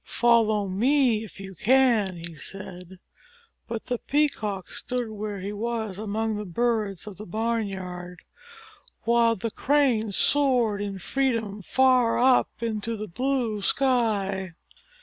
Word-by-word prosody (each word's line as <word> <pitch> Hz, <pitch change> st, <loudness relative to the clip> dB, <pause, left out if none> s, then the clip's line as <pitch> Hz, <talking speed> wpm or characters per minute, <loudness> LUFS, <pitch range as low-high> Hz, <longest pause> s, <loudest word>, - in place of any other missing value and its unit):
"Follow 220 Hz, -4 st, +2 dB
me 235 Hz, +3 st, +2 dB
if 210 Hz, -, -12 dB
you 195 Hz, 0 st, -8 dB
can," 225 Hz, -3 st, +3 dB
he 170 Hz, -, -8 dB
said. 180 Hz, +2 st, -8 dB, 0.7 s
But 230 Hz, -1 st, -5 dB
the 245 Hz, -2 st, -2 dB
Peacock 215 Hz, -10 st, -1 dB
stood 245 Hz, -2 st, -3 dB
where 210 Hz, -1 st, -5 dB
he 200 Hz, +2 st, -4 dB
was 220 Hz, -2 st, -3 dB
among 220 Hz, +1 st, -2 dB
the 210 Hz, -, -4 dB
birds 210 Hz, -1 st, -1 dB
of 205 Hz, -4 st, -9 dB
the 210 Hz, -, -8 dB
barnyard, 190 Hz, -4 st, -3 dB, 0.8 s
while 235 Hz, 0 st, +3 dB
the 225 Hz, +3 st, -4 dB
Crane 255 Hz, -7 st, +2 dB
soared 245 Hz, -4 st, +2 dB
in 200 Hz, -1 st, -4 dB
freedom 225 Hz, -1 st, -1 dB
far 255 Hz, +2 st, +3 dB
up 255 Hz, +1 st, +4 dB
into 225 Hz, 0 st, -2 dB
the 215 Hz, +1 st, -5 dB
blue 240 Hz, +1 st, -1 dB
sky. 200 Hz, -8 st, 0 dB
220 Hz, 130 wpm, -26 LUFS, 195-240 Hz, 0.8 s, up